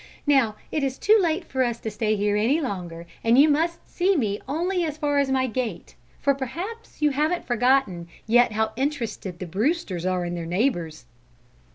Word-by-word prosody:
"Now 270 -7 +3 0.2
it 305 - -1
is 265 -1 -1
too 435 +2 +4
late 335 +1 0
for 260 -1 0
us 235 -2 -2
to 220 - -4
stay 215 +1 0
here 205 0 +1
any 235 +9 +2
longer, 180 - -5 0.2
and 230 +2 +4
you 285 +3 +7
must 330 +3 0
see 380 +2 +1
me 210 -6 -1
only 350 +6 0
as 310 -2 -3
far 290 -2 +1
as 280 -1 +1
my 260 -1 +2
gate, 235 -6 -4 0.3
for 280 - +2
perhaps 340 - -6
you 295 - +4
haven't 305 +5 0
forgotten 240 -8 +1 0.2
yet 240 0 +4
how 220 0 0
interested 240 - -3
the 185 - -6
Brewsters 195 - -1
are 185 -1 0
in 175 - -3
their 170 -1 -4
neighbours." 175 - -1
255 Hz, 190 wpm, -24 LUFS, 205-295 Hz, 0.3 s, you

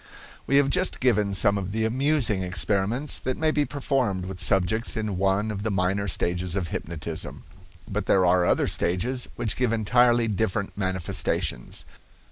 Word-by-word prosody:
We 140 - +2
have 140 -1 +4
just 185 +5 0
given 105 -6 +2
some 100 +1 +3
of 95 0 -5
the 110 +1 0
amusing 130 -4 +2
experiments 100 +8 0
that 130 0 -3
may 160 -1 +2
be 150 -1 +1
performed 130 -10 -1
with 95 -1 -7
subjects 105 +5 +1
in 110 -3 -2
one 95 +3 +1
of 100 -2 -5
the 110 - -1
minor 100 +1 0
stages 90 0 -1
of 90 -4 -2
hypnotism. 80 -2 -5 0.4
But - - -3
there 95 -1 +4
are 90 0 +4
other - - +2
stages 125 +9 -1
which 115 -3 -2
give 125 -3 0
entirely 120 +1 +3
different 105 -1 -2
manifestations. 95 -9 -2
105 Hz, 160 wpm, -25 LUFS, 95-120 Hz, 0.4 s, have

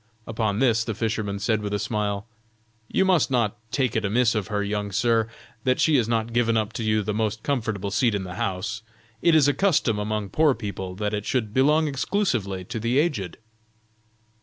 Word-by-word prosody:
Upon 110 -2 -1
this 115 -2 +3
the 110 -2 -4
fisherman 110 -2 -2
said 110 +2 0
with 105 0 -2
a - - +1
smile: 105 -1 -2 0.6
"You 190 - +1
must 185 -6 +3
not 120 -5 +1 0.2
take 130 -3 0
it 110 - +1
amiss 115 +3 +2
of 105 -3 -2
her, 105 -2 -1
young 100 0 -2
sir, 115 +2 +2 0.3
that 130 0 +1
she 160 - +4
has 115 -3 +1
not 115 0 0
given 115 -1 +2
up 110 0 -1
to 115 - -4
you 110 -1 +1
the 105 - -2
most 110 0 -1
comfortable 110 -7 -2
seat 110 +1 +2
in 100 - -2
the 90 -1 -7
house; 100 +4 -3 0.4
it 170 -2 +4
is 150 -3 +5
a 145 - +3
custom 140 - +2
among 105 -1 -2
poor 150 +5 +3
people, 95 -4 -5
that 105 +1 -2
it 105 -1 -3
should 115 -6 -1
belong 150 +5 +3
exclusively 125 - -1
to 110 - -5
the 115 +4 0
aged." 145 - 0
110 Hz, 200 wpm, -24 LUFS, 105-125 Hz, 0.6 s, is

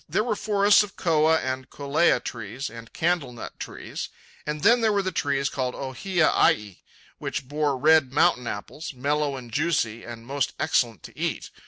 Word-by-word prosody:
There 215 - +1
were 230 -2 -1
forests 205 -1 +4
of 205 -1 -5
koa 160 -2 +3
and 130 -2 -3
kolea 145 0 +2
trees, 120 +4 -5
and 115 0 -11
candlenut 160 -9 -2
trees; - - -6 0.4
and 150 0 -3
then 235 +2 +6
there 220 -1 +3
were 200 -1 +1
the 190 - -1
trees 140 -4 0
called 130 -2 -2
ohia 155 +6 0
ai, 105 -3 +2 0.4
which 130 - -4
bore 145 -1 0
red 155 -1 +4
mountain 135 -5 +3
apples, 135 +9 -6
mellow 145 +2 0
and 125 -3 -9
juicy 120 -5 0
and 115 -1 -9
most 140 +2 -1
excellent 120 - +1
to - - -11
eat. - - -3
140 Hz, 170 wpm, -25 LUFS, 125-165 Hz, 0.4 s, then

